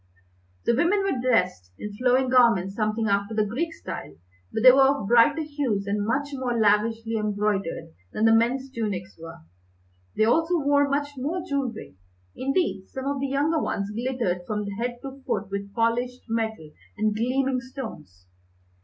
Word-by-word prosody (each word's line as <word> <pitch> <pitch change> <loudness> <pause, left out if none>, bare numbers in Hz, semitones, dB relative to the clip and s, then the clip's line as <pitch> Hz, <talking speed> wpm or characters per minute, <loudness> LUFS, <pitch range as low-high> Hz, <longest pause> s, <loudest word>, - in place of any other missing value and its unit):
The 235 - +3
women 355 - +2
were 390 -10 0
dressed 180 - +1
in 210 - -6
flowing 255 +3 +2
garments 230 -7 +4
something 215 +1 -1
after 200 +2 0
the 215 -1 +2
Greek 285 +11 -2
style, 80 - -8 0.4
but 220 - -2
they 255 - +11
were 270 +2 +5
of 275 -7 0
brighter 240 +7 +5
hues 280 -10 -2
and 205 +1 -1
much 285 +5 0
more 255 -3 -2
lavishly 225 +1 +2
embroidered 205 - -2 0.2
than 215 - 0
the 225 - +6
men's 255 +4 +1
tunics 200 -6 -4
were. 165 - -10 0.8
They 215 - +4
also 325 +9 +2
wore 285 -1 +2
much 285 +1 0
more 320 +7 -2
jewellery. 250 - -3 0.4
Indeed, 275 - -1
some 265 0 -6
of 280 0 -1
the 275 - -1
younger 290 +4 +1
ones 200 +1 -2
glittered 230 -6 -2
from 210 -1 -2
head 240 +1 -2
to 270 0 -8
foot 195 -4 -3
with 200 0 -4
polished 240 +2 0
metal 220 -8 -3 0.3
and 215 0 +1
gleaming 255 +3 0
stones. 220 - -9
230 Hz, 160 wpm, -25 LUFS, 210-270 Hz, 0.8 s, they